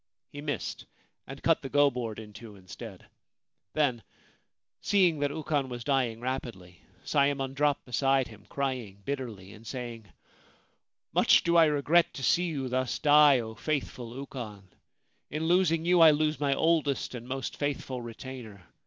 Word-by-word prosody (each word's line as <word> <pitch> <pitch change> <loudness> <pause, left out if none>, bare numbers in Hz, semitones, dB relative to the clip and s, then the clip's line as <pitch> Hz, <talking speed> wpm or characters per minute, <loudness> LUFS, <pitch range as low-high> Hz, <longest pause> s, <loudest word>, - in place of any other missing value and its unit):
He 145 - -8
missed, 145 0 -4 0.4
and 135 +1 -9
cut 165 - +3
the 135 - -6
go 145 0 +4
board 120 -4 -4
in 105 -1 -10
two 110 0 -11
instead. 95 -4 -11 0.7
Then, 135 -6 +1 0.8
seeing 185 -6 +3
that 145 0 +1
Ukon 145 -2 -2
was 120 -1 -6
dying 125 -4 0
rapidly, 115 - -5 0.2
Sayemon 140 -2 +1
dropped 145 0 +1
beside 135 +1 +1
him, 105 -2 -15
crying 125 -8 -4
bitterly 115 -8 -5
and 110 +1 -14
saying: 115 -6 -7 0.5
' - - -46
Much - - +5
do 170 0 +1
I 165 -1 +7
regret 155 +3 +2
to 135 - -6
see 175 +7 +3
you 140 -5 -3
thus 130 0 -1
die, 150 -2 +6
oh 110 -1 -7
faithful 120 -2 -4
Ukon! 115 -8 -8 0.6
In 155 +3 -3
losing 165 -2 +2
you 175 0 +4
I 165 - +10
lose 155 0 +1
my 140 -2 +1
oldest 155 -5 +1
and 120 -1 -8
most 135 +1 -4
faithful 135 -3 -3
retainer. 120 -4 -9
135 Hz, 155 wpm, -29 LUFS, 115-150 Hz, 0.8 s, I